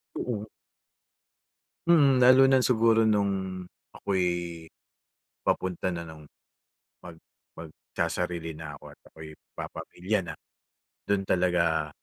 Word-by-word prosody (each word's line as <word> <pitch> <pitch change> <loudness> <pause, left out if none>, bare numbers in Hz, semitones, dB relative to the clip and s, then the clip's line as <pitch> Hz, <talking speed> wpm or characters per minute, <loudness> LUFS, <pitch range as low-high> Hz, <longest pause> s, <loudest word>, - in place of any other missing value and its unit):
Oo. 110 -3 -4 1.4
Mm, 145 -6 +5
lalo 130 +1 +7
na 135 - +5
siguro 115 -3 +3
nung 95 -3 0 0.3
ako'y, 85 -3 -2 0.7
papunta 95 0 -1
na 85 -2 -4
ng 80 -2 -12 0.8
mag 85 -2 -10 0.4
magsasarili 80 +1 -4
na 75 -2 -8
ako - - -18
at - - -24
ako'y 80 0 -11 0.3
papamilya 100 +4 -3
na, 80 -2 -6 0.7
dun 100 -1 +1
talaga 85 -4 +1
90 Hz, 100 wpm, -27 LUFS, 85-110 Hz, 1.4 s, lalo